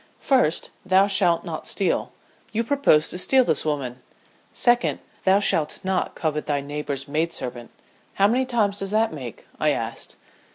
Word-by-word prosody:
"First, 255 Hz, -, +1 dB
thou 190 Hz, +1 st, +4 dB
shalt 185 Hz, -4 st, +2 dB
not -, -, -6 dB
steal. -, -, -1 dB, 0.4 s
You 230 Hz, +1 st, 0 dB
propose 255 Hz, -, +3 dB
to 180 Hz, -, -3 dB
steal 260 Hz, +7 st, +4 dB
this -, -, +2 dB
woman. 135 Hz, -5 st, -3 dB, 0.5 s
Second, 240 Hz, 0 st, +2 dB, 0.3 s
thou 190 Hz, +1 st, +5 dB
shalt 165 Hz, -6 st, +1 dB
not 190 Hz, 0 st, -1 dB
covet 150 Hz, -2 st, -2 dB
thy 145 Hz, -1 st, 0 dB
neighbor's 140 Hz, -1 st, -5 dB
maid 160 Hz, +4 st, -1 dB
servant. 120 Hz, -2 st, -6 dB, 0.5 s
How 195 Hz, -, +4 dB
many 250 Hz, +4 st, +1 dB
times 210 Hz, -5 st, 0 dB
does 195 Hz, -, -4 dB
that 220 Hz, -1 st, +1 dB
make?" 125 Hz, -7 st, -8 dB
I -, -, +2 dB
asked. -, -, -4 dB
185 Hz, 160 wpm, -23 LUFS, 150-215 Hz, 0.5 s, thou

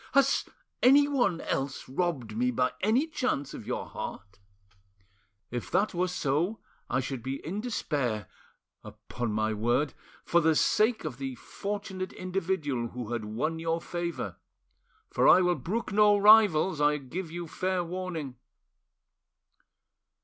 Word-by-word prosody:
Has 275 Hz, 0 st, +3 dB, 0.4 s
anyone 275 Hz, -8 st, +4 dB
else 135 Hz, 0 st, -3 dB
robbed 135 Hz, -7 st, -2 dB
me 125 Hz, +2 st, +1 dB
by 125 Hz, +1 st, +1 dB
any 225 Hz, +9 st, +3 dB
chance 255 Hz, -, -2 dB
of -, -, -9 dB
your -, -, -2 dB
heart? 100 Hz, -1 st, -8 dB, 1.1 s
If 120 Hz, -1 st, -4 dB
that 195 Hz, +4 st, +1 dB
were 180 Hz, +1 st, +1 dB
so, 175 Hz, +4 st, -1 dB, 0.3 s
I 130 Hz, -, +1 dB
should 130 Hz, -1 st, -4 dB
be 130 Hz, +3 st, -3 dB
in 195 Hz, +7 st, -3 dB
despair, 140 Hz, -, -2 dB, 0.6 s
upon 120 Hz, -2 st, -5 dB
my 110 Hz, +1 st, 0 dB
word 120 Hz, +7 st, +1 dB, 0.3 s
for 170 Hz, -, +3 dB
the 160 Hz, -1 st, +3 dB
sake 220 Hz, +4 st, +2 dB
of 135 Hz, -5 st, -5 dB
the 135 Hz, -2 st, -4 dB
fortunate 195 Hz, -, -5 dB
individual 180 Hz, -9 st, -2 dB
who 120 Hz, -1 st, -6 dB
had 115 Hz, -3 st, -3 dB
won 140 Hz, +10 st, -2 dB
your 165 Hz, 0 st, -1 dB
favour; 175 Hz, +1 st, -4 dB, 0.7 s
for -, -, +3 dB
I 185 Hz, -, +8 dB
will 180 Hz, -1 st, +3 dB
brook 210 Hz, +7 st, -3 dB
no 210 Hz, 0 st, +5 dB
rivals, 200 Hz, -6 st, +6 dB
I 150 Hz, 0 st, +4 dB
give 160 Hz, +6 st, -6 dB
you 170 Hz, +1 st, -6 dB
fair 185 Hz, +2 st, -1 dB
warning." 170 Hz, -7 st, -5 dB
165 Hz, 135 wpm, -29 LUFS, 130-190 Hz, 1.1 s, I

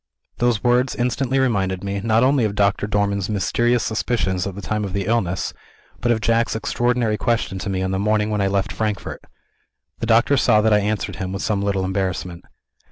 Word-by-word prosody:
Those 120 Hz, -3 st, +1 dB
words 125 Hz, +1 st, +2 dB
instantly 125 Hz, +2 st, 0 dB
reminded 95 Hz, -8 st, 0 dB
me, 100 Hz, 0 st, -2 dB
not 115 Hz, +1 st, +3 dB
only 135 Hz, -1 st, +3 dB
of 105 Hz, -2 st, -1 dB
Doctor 100 Hz, 0 st, +1 dB
Dormann's 100 Hz, -1 st, 0 dB
mysterious 120 Hz, +3 st, +1 dB
suspicions 110 Hz, -5 st, -1 dB
at 95 Hz, -, -6 dB
the -, -, -7 dB
time 105 Hz, +2 st, -2 dB
of 100 Hz, -2 st, -4 dB
the 100 Hz, -1 st, -1 dB
illness, 100 Hz, -5 st, -1 dB, 0.5 s
but 120 Hz, -, +1 dB
of 110 Hz, -2 st, +1 dB
Jack's 115 Hz, 0 st, +1 dB
extraordinary 120 Hz, -1 st, 0 dB
question 115 Hz, -5 st, -1 dB
to 95 Hz, -, -4 dB
me, 95 Hz, -1 st, -1 dB
on 95 Hz, -, -1 dB
the 95 Hz, -, -1 dB
morning 105 Hz, +1 st, +1 dB
when 105 Hz, -1 st, 0 dB
I 100 Hz, -, +2 dB
left 95 Hz, 0 st, 0 dB
Frankfort. 105 Hz, -4 st, -3 dB, 0.8 s
The 115 Hz, -, -3 dB
doctor 115 Hz, +5 st, +4 dB
saw 110 Hz, -4 st, +4 dB
that 110 Hz, 0 st, +3 dB
I 105 Hz, -, +5 dB
answered 105 Hz, +1 st, -2 dB
him 95 Hz, -1 st, -4 dB
with 95 Hz, 0 st, -4 dB
some 105 Hz, -3 st, 0 dB
little 100 Hz, -2 st, 0 dB
embarrassment. 95 Hz, -2 st, -3 dB
105 Hz, 200 wpm, -21 LUFS, 100-115 Hz, 0.8 s, I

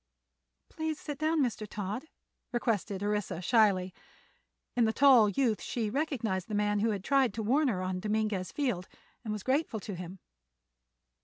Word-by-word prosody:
"Please 315 Hz, -1 st, -3 dB
sit 290 Hz, -2 st, -6 dB
down, 310 Hz, 0 st, +2 dB
Mr. 220 Hz, -4 st, -2 dB
Todd," 210 Hz, +6 st, -4 dB, 0.5 s
requested 215 Hz, -5 st, -1 dB
Orissa, 205 Hz, -4 st, -1 dB
shyly. 190 Hz, -3 st, +3 dB, 0.8 s
In 240 Hz, -2 st, +4 dB
the 220 Hz, -, +1 dB
tall 255 Hz, -6 st, +6 dB
youth 225 Hz, 0 st, +1 dB
she 235 Hz, -3 st, -2 dB
had 210 Hz, -, -3 dB
recognized 235 Hz, -, -1 dB
the 215 Hz, -, -3 dB
man 205 Hz, 0 st, +1 dB
who 225 Hz, +2 st, +2 dB
had 200 Hz, -3 st, -2 dB
tried 265 Hz, -5 st, +2 dB
to 225 Hz, -, -2 dB
warn 275 Hz, +7 st, +3 dB
her 185 Hz, -7 st, -1 dB
on 185 Hz, 0 st, -2 dB
Dominguez 210 Hz, -2 st, -1 dB
Field, 245 Hz, -11 st, -1 dB, 0.4 s
and 220 Hz, -, -4 dB
was 210 Hz, -2 st, -4 dB
grateful 265 Hz, -4 st, 0 dB
to 200 Hz, -, -6 dB
him. 180 Hz, +1 st, -7 dB
215 Hz, 165 wpm, -30 LUFS, 200-260 Hz, 0.8 s, tall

